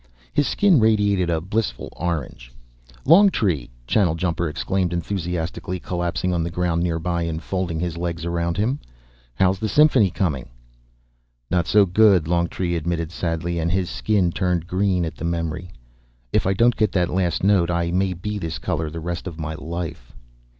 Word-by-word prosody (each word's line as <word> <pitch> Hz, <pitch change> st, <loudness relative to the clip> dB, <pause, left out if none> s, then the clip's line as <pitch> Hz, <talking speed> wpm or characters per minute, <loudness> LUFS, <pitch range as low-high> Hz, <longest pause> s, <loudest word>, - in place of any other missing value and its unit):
His 145 Hz, -, +2 dB
skin 195 Hz, -8 st, +4 dB
radiated 105 Hz, -5 st, +3 dB
a 80 Hz, -1 st, +1 dB
blissful 95 Hz, -, -2 dB
orange. 75 Hz, -8 st, -4 dB, 0.5 s
"Longtree!" 130 Hz, -, +4 dB, 0.2 s
Channeljumper 85 Hz, -, +1 dB
exclaimed 90 Hz, +3 st, -1 dB
enthusiastically, 90 Hz, 0 st, -3 dB
collapsing 90 Hz, +1 st, -2 dB
on 85 Hz, -1 st, 0 dB
the 85 Hz, -, -2 dB
ground 85 Hz, -1 st, 0 dB
nearby 85 Hz, 0 st, -1 dB
and 85 Hz, -1 st, -2 dB
folding 90 Hz, -2 st, -3 dB
his 85 Hz, -1 st, -3 dB
legs 85 Hz, -1 st, -3 dB
around 85 Hz, 0 st, -1 dB
him. 120 Hz, +8 st, 0 dB, 0.6 s
"How's 95 Hz, +6 st, +2 dB
the 110 Hz, 0 st, -2 dB
symphony 135 Hz, -6 st, +5 dB
coming?" 75 Hz, -, -2 dB, 1.0 s
"Not 90 Hz, -1 st, +1 dB
so 105 Hz, -1 st, +5 dB
good," 95 Hz, -3 st, +4 dB
Longtree 85 Hz, +1 st, 0 dB
admitted 85 Hz, 0 st, -2 dB
sadly, 85 Hz, 0 st, -2 dB
and 85 Hz, +1 st, 0 dB
his 90 Hz, 0 st, 0 dB
skin 100 Hz, -5 st, +1 dB
turned 90 Hz, -2 st, 0 dB
green 90 Hz, -1 st, +1 dB
at 80 Hz, -, -4 dB
the -, -, -8 dB
memory. 85 Hz, 0 st, -3 dB, 0.6 s
"If -, -, +2 dB
I 95 Hz, -, +3 dB
don't 115 Hz, +4 st, +3 dB
get 110 Hz, -3 st, +1 dB
that 90 Hz, -3 st, +1 dB
last 90 Hz, -2 st, 0 dB
note, 95 Hz, -4 st, +3 dB
I 85 Hz, -1 st, 0 dB
may 95 Hz, +1 st, +1 dB
be 105 Hz, +4 st, -4 dB
this 80 Hz, -3 st, -4 dB
color 80 Hz, -4 st, -2 dB
the 80 Hz, +2 st, -6 dB
rest 85 Hz, +2 st, -4 dB
of 85 Hz, -4 st, -7 dB
my 80 Hz, 0 st, -3 dB
life." 80 Hz, -5 st, -6 dB
85 Hz, 165 wpm, -22 LUFS, 85-95 Hz, 1.0 s, symphony